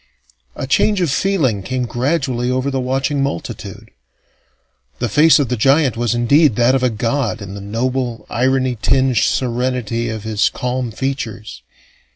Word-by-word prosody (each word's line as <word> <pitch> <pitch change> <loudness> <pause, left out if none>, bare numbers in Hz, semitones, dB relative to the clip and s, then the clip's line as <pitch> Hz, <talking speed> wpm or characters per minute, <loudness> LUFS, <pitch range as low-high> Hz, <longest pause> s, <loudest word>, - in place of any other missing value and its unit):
A - - -4
change 200 +9 +2
of 170 -6 +1
feeling 145 - +1
came 130 +5 -2
gradually 125 -1 -1
over 130 +2 -1
the 135 - -1
watching 135 +2 -1
multitude. 135 -11 -5 1.1
The 120 - -1
face 150 +9 +5
of 140 -6 0
the 125 - 0
giant 135 +3 +3
was 120 0 0
indeed 140 +2 +3
that 120 +2 +3
of 135 - +1
a 125 - +2
god 115 +1 -1
in 100 -2 -8
the 100 - -7
noble, 120 +3 -2
irony 130 -1 0
tinged 130 -2 +2
serenity 120 -2 0
of 110 -2 -5
his 110 -2 +1
calm 125 0 -3
features. 110 - -5
125 Hz, 155 wpm, -18 LUFS, 115-135 Hz, 1.1 s, face